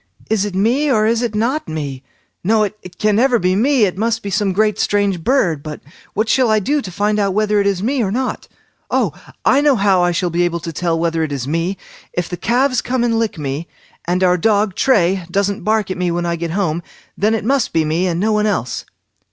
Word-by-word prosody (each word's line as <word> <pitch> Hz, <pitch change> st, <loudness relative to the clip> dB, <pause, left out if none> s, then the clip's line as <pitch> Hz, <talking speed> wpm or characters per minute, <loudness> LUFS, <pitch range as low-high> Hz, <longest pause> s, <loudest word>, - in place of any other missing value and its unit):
"Is 210 Hz, -2 st, +2 dB
it 200 Hz, -3 st, -5 dB
me, 245 Hz, +10 st, +2 dB
or 215 Hz, -3 st, +3 dB
is 230 Hz, +1 st, +2 dB
it 235 Hz, -3 st, -2 dB
not 245 Hz, +8 st, 0 dB
me? 145 Hz, -4 st, -4 dB, 0.4 s
No, 215 Hz, +3 st, +3 dB
it 195 Hz, -3 st, -6 dB
can 210 Hz, -1 st, +2 dB
never 250 Hz, +1 st, +4 dB
be 185 Hz, -3 st, +1 dB
me; 255 Hz, +3 st, +3 dB
it 185 Hz, -1 st, -3 dB
must 225 Hz, 0 st, 0 dB
be 200 Hz, -, -4 dB
some 200 Hz, 0 st, +1 dB
great 210 Hz, +2 st, +1 dB
strange 200 Hz, -4 st, +1 dB
bird. 180 Hz, -, +1 dB
But 150 Hz, 0 st, -7 dB, 0.4 s
what 215 Hz, +2 st, +1 dB
shall 250 Hz, +1 st, +3 dB
I 215 Hz, -, +4 dB
do 285 Hz, +9 st, 0 dB
to 190 Hz, -, -7 dB
find 210 Hz, +3 st, 0 dB
out 200 Hz, -2 st, 0 dB
whether 210 Hz, 0 st, +2 dB
it 200 Hz, -, +1 dB
is 195 Hz, -1 st, 0 dB
me 260 Hz, +3 st, 0 dB
or 205 Hz, -, 0 dB
not. 255 Hz, +4 st, -2 dB, 0.4 s
Oh! -, -, +1 dB, 0.3 s
I 275 Hz, -, +4 dB
know 290 Hz, -2 st, +4 dB
how 195 Hz, -4 st, +3 dB
I 175 Hz, 0 st, +2 dB
shall 175 Hz, 0 st, -1 dB
be 170 Hz, +1 st, 0 dB
able 175 Hz, -1 st, 0 dB
to 165 Hz, 0 st, -6 dB
tell 170 Hz, 0 st, -1 dB
whether 165 Hz, 0 st, 0 dB
it 155 Hz, -2 st, -2 dB
is 135 Hz, -3 st, -3 dB
me; 165 Hz, +5 st, -1 dB, 0.4 s
if 175 Hz, -1 st, -2 dB
the 180 Hz, -, -4 dB
calves 255 Hz, +6 st, +1 dB
come 250 Hz, -1 st, -1 dB
and 230 Hz, -1 st, +1 dB
lick 225 Hz, -5 st, -1 dB
me, 145 Hz, +2 st, -4 dB, 0.4 s
and 180 Hz, +2 st, 0 dB
our 180 Hz, 0 st, +4 dB
dog 210 Hz, 0 st, +2 dB
Tray 190 Hz, -6 st, +2 dB
doesn't 200 Hz, +2 st, 0 dB
bark 215 Hz, -3 st, +1 dB
at -, -, -3 dB
me 180 Hz, -1 st, +1 dB
when 175 Hz, 0 st, -1 dB
I 170 Hz, 0 st, 0 dB
get 170 Hz, 0 st, -4 dB
home, 175 Hz, -4 st, 0 dB, 0.3 s
then 215 Hz, +3 st, +1 dB
it 215 Hz, -, -3 dB
must 270 Hz, 0 st, +1 dB
be 160 Hz, -1 st, +1 dB
me, 165 Hz, +4 st, 0 dB
and 170 Hz, -1 st, -1 dB
no 215 Hz, +3 st, +1 dB
one 210 Hz, 0 st, +2 dB
else." 155 Hz, -, -2 dB
200 Hz, 240 wpm, -18 LUFS, 175-225 Hz, 0.4 s, never